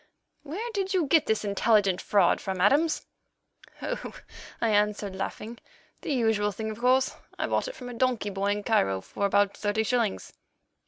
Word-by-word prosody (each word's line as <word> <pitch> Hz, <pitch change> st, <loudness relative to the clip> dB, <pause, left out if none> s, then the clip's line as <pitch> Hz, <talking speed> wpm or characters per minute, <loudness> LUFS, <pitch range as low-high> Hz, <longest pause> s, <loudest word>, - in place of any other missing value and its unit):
"Hum—where 370 Hz, +12 st, -5 dB
did 385 Hz, -2 st, -1 dB
you 355 Hz, -4 st, +2 dB
get 315 Hz, +2 st, +3 dB
this 220 Hz, -1 st, 0 dB
intelligent 200 Hz, -2 st, +2 dB
fraud 205 Hz, -, +3 dB
from, 190 Hz, -1 st, -4 dB
Adams?" 290 Hz, -, +3 dB, 0.8 s
"Oh!" -, -, -4 dB, 0.4 s
I 230 Hz, -, +1 dB
answered, 210 Hz, -2 st, +1 dB
laughing, 215 Hz, +4 st, -5 dB, 0.4 s
"the -, -, -4 dB
usual 220 Hz, -5 st, +1 dB
thing, 220 Hz, +2 st, -4 dB
of 215 Hz, -, -8 dB
course. 255 Hz, +2 st, +3 dB, 0.2 s
I -, -, -1 dB
bought -, -, 0 dB
it -, -, -7 dB
from 250 Hz, -, -9 dB
a -, -, -7 dB
donkey 240 Hz, -4 st, 0 dB
boy 195 Hz, +1 st, -2 dB
in 205 Hz, 0 st, 0 dB
Cairo 95 Hz, -, +1 dB
for 200 Hz, -, -2 dB
about 200 Hz, 0 st, +2 dB
thirty 210 Hz, +1 st, 0 dB
shillings." 230 Hz, -3 st, -1 dB
220 Hz, 170 wpm, -27 LUFS, 205-255 Hz, 0.8 s, get